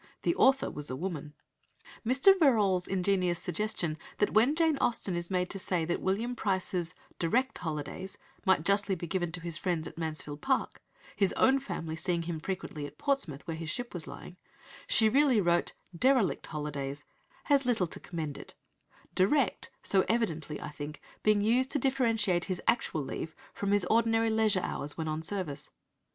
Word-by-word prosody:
The 345 - +2
author 270 -4 +4
was 150 0 -2
a 130 - -3
woman. 150 -2 -5 0.7
Mr. 260 - +6
Verrall's 205 - +3
ingenious 185 -2 +1
suggestion 170 -3 -2 0.2
that 205 - +1
when 240 +8 +4
Jane 320 -3 +2
Austen 200 -6 0
is 175 0 -3
made 180 -1 0
to 195 - -5
say 180 -3 -1
that 175 +1 -1
William 225 +6 0
Price's 185 -5 -1 0.2
"direct 250 +11 +1
holidays" 160 +3 -5 0.3
might 190 -4 +3
justly 200 0 +3
be 175 - -5
given 175 0 -1
to 180 - -4
his 170 -1 -3
friends 170 -4 -1
at - - -10
Mansfield 155 -2 -4
Park 265 -1 0 0.3
(his 195 -3 +2
own 270 +1 +4
family 165 -12 -5
seeing 170 +1 -1
him 165 -1 -4
frequently 155 -4 -4
at - - -15
Portsmouth, 235 - -1
where 165 -1 -3
his 160 0 -5
ship 245 +7 -2
was 175 -4 -5
lying), 180 - -9 0.5
she 220 - +5
really 265 0 +4
wrote 175 -2 +2 0.2
"derelict 250 -1 +2
holidays," 145 -2 -4 0.4
has 280 -3 +3
little 225 -7 +2
to 165 - -6
commend 155 -4 -5
it, - - -11 0.6
"direct" 225 +5 +2
so 190 -1 +3
evidently, 165 -10 0
I 150 - -6
think, 150 0 -7 0.2
being 210 -1 +3
used 250 +4 +3
to - - +3
differentiate 230 -9 +1
his 185 -3 -2
actual 160 -10 +1
leave 160 +3 -5 0.2
from 200 0 -2
his 205 -3 +3
ordinary 225 +1 +3
leisure 220 -3 +3
hours 145 -4 -4
when 160 -1 -3
on 155 0 -2
service. 160 -5 -4
185 Hz, 170 wpm, -30 LUFS, 160-225 Hz, 0.7 s, Mr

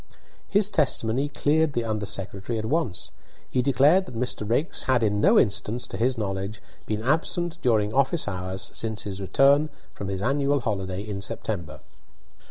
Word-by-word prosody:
His 205 0 +4
testimony 135 - +1
cleared 150 +1 +1
the 120 - 0
under 110 -2 -2
secretary 100 +3 -3
at 110 - -3
once. 130 - -1 0.4
He 125 - 0
declared 145 +8 +4
that 125 - -9
Mr. 115 -3 -1
Raikes 145 +9 +1
had 130 -3 +2
in 105 -1 +1
no - - +5
instance, 115 +3 +2
to - - -7
his 125 +2 +1
knowledge, 100 0 -3 0.3
been 110 0 -2
absent 165 +5 0
during 110 -3 +2
office 140 +3 +2
hours 95 0 -3
since 110 -2 -3
his 100 -1 -5
return 140 +9 +4 0.2
from 100 - -6
his 95 0 -3
annual 140 +2 +1
holiday 95 -4 -2
in 105 -2 -5
September. 90 - -4
115 Hz, 165 wpm, -25 LUFS, 100-140 Hz, 0.4 s, no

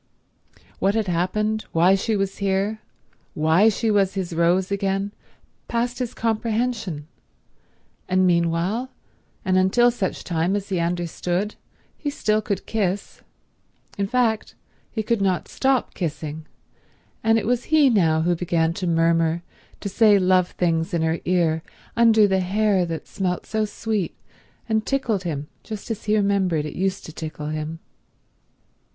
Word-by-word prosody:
What 195 +2 +2
had 220 -1 +1
happened, 210 +5 0
why 175 +3 +5
she 205 +3 +1
was 195 -1 -2
here, 200 +2 0 0.5
why 160 +8 +4
she 220 +1 0
was 200 -2 +2
his 185 -3 -3
Rose 175 +3 +2
again, 195 0 -1 0.6
passed 240 +1 -1
his 250 -2 -3
comprehension; 220 -7 -1 1.0
and 185 0 +3
meanwhile, 175 +7 +1 0.6
and 185 0 +3
until 240 +6 +4
such 200 -6 -3
time 170 +2 0
as 200 -1 -3
he 185 -3 0
understood, 175 +3 -1 0.5
he 290 - -2
still 215 -6 +1
could 200 -3 -3
kiss. 200 -3 -2 0.7
In 200 0 -1
fact 225 -1 0 0.3
he 220 - -3
could 225 -1 0
not 185 -3 +1
stop 265 -2 0
kissing; 155 -2 -4 0.8
and 225 0 +4
it 225 - -1
was 245 +1 0
he 310 -3 +5
now 165 -10 +3
who 175 +1 +2
began 165 -1 0
to 185 0 -3
murmur, 165 0 +2 0.4
to - - -3
say 205 +1 +5
love 185 -1 +3
things 165 0 0
in 165 - +1
her 160 +1 0
ear 170 -3 +2 0.3
under 225 -2 +6
the 190 -1 +2
hair 195 0 +1
that 165 -1 -5
smelt 180 -2 -2
so 220 0 0
sweet 210 -3 -2 0.5
and 220 -1 +1
tickled 225 -9 -1
him 150 -3 -3
just 215 +1 -7
as 220 - -5
he 215 0 +2
remembered 190 -6 +1
it 150 - -6
used 190 +1 -1
to 160 - -9
tickle 155 -2 -6
him. 155 +1 -4
190 Hz, 145 wpm, -23 LUFS, 170-215 Hz, 1.0 s, under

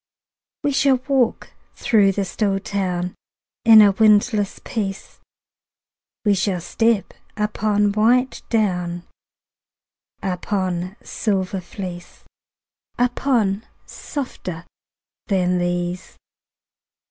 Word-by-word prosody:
We 290 - +1
shall 275 0 +3
walk 265 -5 +1 0.2
through 200 -4 +3
the 200 0 -1
still 195 +1 0
town 180 -3 -2 0.5
In 220 -2 +9
a 205 - +6
windless 210 0 +3
peace; 195 -4 -4 1.1
We 205 - +4
shall 190 -1 0
step 220 +5 0 0.2
upon 210 -1 +1
white 240 +5 +2
down, 180 -6 0 1.2
Upon 185 -1 -2
silver 195 -3 -2
fleece, 175 -1 -8 0.7
Upon 240 -5 +1 0.2
softer 185 - -6 0.6
than 180 -3 +1
these. 175 0 -3
200 Hz, 85 wpm, -21 LUFS, 180-220 Hz, 1.2 s, In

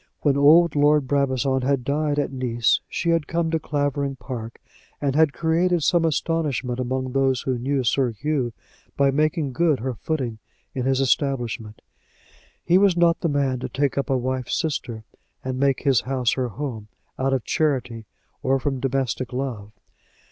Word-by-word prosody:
When 145 -2 +2
old 150 +3 +5
Lord 145 -1 +3
Brabazon 135 -1 +1
had 135 0 0
died 145 +2 0
at 145 - 0
Nice 120 -3 +1
she 170 - -1
had 165 -3 +1
come 165 -1 -1
to 160 - +1
Clavering 145 -2 -1
Park, 115 -1 -7 0.4
and 140 -2 -1
had 155 -1 +4
created 170 +2 +1
some 170 0 +3
astonishment 145 -5 -1
among 130 +1 -2
those 135 -2 +1
who 130 -2 -2
knew 135 +2 0
Sir 130 +1 +2
Hugh 130 +2 -2 0.5
by 140 -1 +4
making 150 -1 0
good 155 0 +2
her 130 +1 -2
footing 125 -4 -3 0.3
in 130 -2 -3
his 135 0 +2
establishment. 120 -5 -1 0.8
He 175 +2 +5
was 195 -3 +3
not 170 -1 +3
the 170 - 0
man 140 -3 0
to - - -5
take 140 -1 0
up 140 - -2
a 135 - +2
wife's 130 0 -2
sister, 125 -9 -3 0.4
and 130 0 -3
make 140 -1 +2
his 135 -4 +3
house 130 -2 0
her 130 -2 -1
home, 120 -3 -6 0.3
out 135 +1 +1
of 130 -3 0
charity 125 -8 -1 0.3
or 135 +1 +2
from 135 0 -2
domestic 130 -1 -2
love. 125 -6 -4
135 Hz, 170 wpm, -23 LUFS, 125-150 Hz, 0.8 s, old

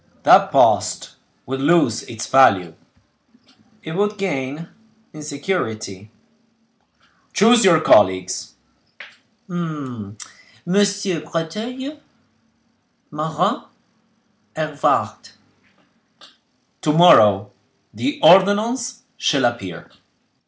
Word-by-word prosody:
"That - - +5
post - - +1 0.3
would 135 +1 -5
lose 145 -6 +2
its 115 -2 -8
value." 100 -11 +3 1.1
"It 160 - -7
would 205 +4 -2
gain 150 -4 -4 0.5
in 155 - -10
security." 110 - -5 1.2
"Choose 230 +3 +4
your 175 -4 +5
colleagues." 95 - +2 0.9
"Messieurs 170 - -4
Breteuil, 240 - -5 1.1
Marin, - - -2 0.9
Hervart." - - -2 1.5
"To 150 - 0
morrow 105 - +5 0.4
the 290 +2 -4
ordonnance 225 +6 +3 0.2
shall 140 -4 +1
appear." 95 -8 -5
160 Hz, 70 wpm, -19 LUFS, -, 1.5 s, That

